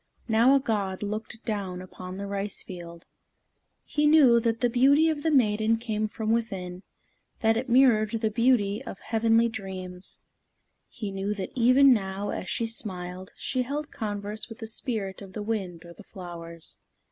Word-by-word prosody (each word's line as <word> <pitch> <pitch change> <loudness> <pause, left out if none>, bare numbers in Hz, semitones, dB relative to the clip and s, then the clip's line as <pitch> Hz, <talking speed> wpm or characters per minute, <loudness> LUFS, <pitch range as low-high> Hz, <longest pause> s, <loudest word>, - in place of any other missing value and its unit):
Now 235 +4 +5
a - - +5
god 205 -7 -2
looked 215 +2 -5
down 195 -5 -3
upon 185 0 -8
the 200 - -4
rice 200 0 -3
field. 170 -2 -9 0.8
He 300 0 +1
knew 280 -6 +7
that 230 -1 0
the 245 - +4
beauty 275 +7 +4
of 305 -2 -1
the 320 - +1
maiden 225 -5 +3
came 220 -2 -2
from 220 +1 -3
within, 190 -6 -2 0.6
that 225 0 +4
it 250 +3 -2
mirrored 235 -4 +5
the 220 -1 -1
beauty 220 -3 +2
of - - -7
heavenly 225 +2 +2
dreams. 190 -5 -7 0.7
He 210 -3 -5
knew 195 +2 -2
that 190 -2 -5
even 255 +2 +6
now, 195 -2 -2
as 185 - -4
she 230 - 0
smiled, 185 -5 -6
she 255 - -1
held 290 +4 -4
converse 210 0 -4
with 225 - -9
the 225 - -7
spirit 220 -4 -3
of 195 -2 -10
the 210 - -4
wind 190 -6 -3
or 170 - -11
the 215 - -14
flowers. 170 -4 -9
215 Hz, 170 wpm, -27 LUFS, 190-235 Hz, 0.8 s, knew